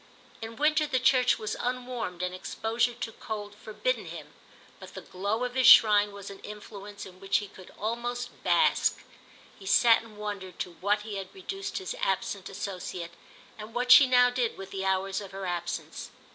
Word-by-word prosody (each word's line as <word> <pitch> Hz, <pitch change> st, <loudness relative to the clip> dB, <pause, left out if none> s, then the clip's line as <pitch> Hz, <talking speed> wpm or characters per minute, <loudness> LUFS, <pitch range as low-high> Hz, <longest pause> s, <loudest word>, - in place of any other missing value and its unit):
In 225 Hz, 0 st, -7 dB
winter 305 Hz, +3 st, +2 dB
the 265 Hz, -3 st, 0 dB
church 255 Hz, -1 st, +4 dB
was 215 Hz, -, -4 dB
unwarmed 245 Hz, -8 st, -3 dB
and 180 Hz, 0 st, -2 dB
exposure 230 Hz, +5 st, -1 dB
to 230 Hz, -1 st, -5 dB
cold 210 Hz, -2 st, -6 dB
forbidden 220 Hz, -, -3 dB
him, -, -, -9 dB, 0.5 s
but -, -, -12 dB
the -, -, -6 dB
glow 200 Hz, +6 st, -2 dB
of 250 Hz, 0 st, -3 dB
his 260 Hz, -1 st, +3 dB
shrine 210 Hz, -4 st, +8 dB
was 200 Hz, -1 st, -9 dB
an 195 Hz, -, -11 dB
influence 205 Hz, -1 st, -9 dB
in 185 Hz, -1 st, -13 dB
which 195 Hz, 0 st, +1 dB
he 205 Hz, -2 st, -4 dB
could 185 Hz, -1 st, -14 dB
almost 240 Hz, +3 st, -3 dB
bask. -, -, +2 dB, 0.6 s
He 195 Hz, -, -11 dB
sat 230 Hz, +3 st, +5 dB
and 220 Hz, -2 st, -15 dB
wondered 205 Hz, -3 st, -6 dB
to 180 Hz, -, -4 dB
what 205 Hz, +2 st, +1 dB
he 210 Hz, -2 st, -5 dB
had 195 Hz, -, -6 dB
reduced 390 Hz, +1 st, -5 dB
his 185 Hz, -, -4 dB
absent 195 Hz, 0 st, -1 dB
associate 185 Hz, -3 st, -6 dB, 0.5 s
and 215 Hz, +1 st, -9 dB
what 250 Hz, +1 st, +1 dB
she 275 Hz, -, +10 dB
now 250 Hz, -1 st, +5 dB
did 245 Hz, -2 st, -1 dB
with 195 Hz, 0 st, -9 dB
the 190 Hz, -1 st, -4 dB
hours 190 Hz, +1 st, 0 dB
of 200 Hz, -, -8 dB
her 195 Hz, 0 st, -5 dB
absence. 175 Hz, -1 st, -4 dB
210 Hz, 185 wpm, -28 LUFS, 195-245 Hz, 0.6 s, she